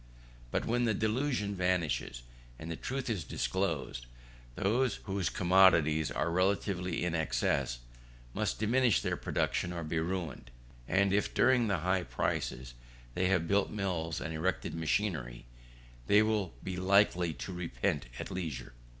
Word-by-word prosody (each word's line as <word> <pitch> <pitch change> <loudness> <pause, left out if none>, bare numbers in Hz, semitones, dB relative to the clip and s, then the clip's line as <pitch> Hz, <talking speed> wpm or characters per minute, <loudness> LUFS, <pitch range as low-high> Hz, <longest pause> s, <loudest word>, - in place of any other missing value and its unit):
But - - -1
when 120 +1 +1
the 110 -2 +1
delusion 110 -1 0
vanishes 90 -9 -1 0.3
and 80 +3 -7
the - - -2
truth 130 +9 -4
is 105 -8 -1
disclosed, 80 -10 -2 0.5
those 115 +4 +1
whose 95 -3 -1
commodities 85 -4 +4
are 85 - -1
relatively 90 -1 0
in 90 - -1
excess 65 -4 0 0.5
must - - -1
diminish 115 -1 +3
their - - 0
production 90 - -1
or 85 -1 -4
be 80 +1 -1
ruined: 85 -5 -3 0.4
and 100 0 +2
if 105 0 0
during 120 -2 +4
the 95 -6 0
high 95 0 +2
prices 65 -7 -3 0.4
they 90 +6 +1
have 90 -3 +1
built 100 +2 +2
mills 90 -6 -2
and 80 - -4
erected 80 +3 -1
machinery, 80 - -1 0.6
they 105 +1 +6
will 105 - -1
be 95 -1 -4
likely 95 -2 +3
to 95 - -6
repent 85 -10 -2
at - - -6
leisure. 80 -11 -5
90 Hz, 140 wpm, -32 LUFS, 80-100 Hz, 0.6 s, they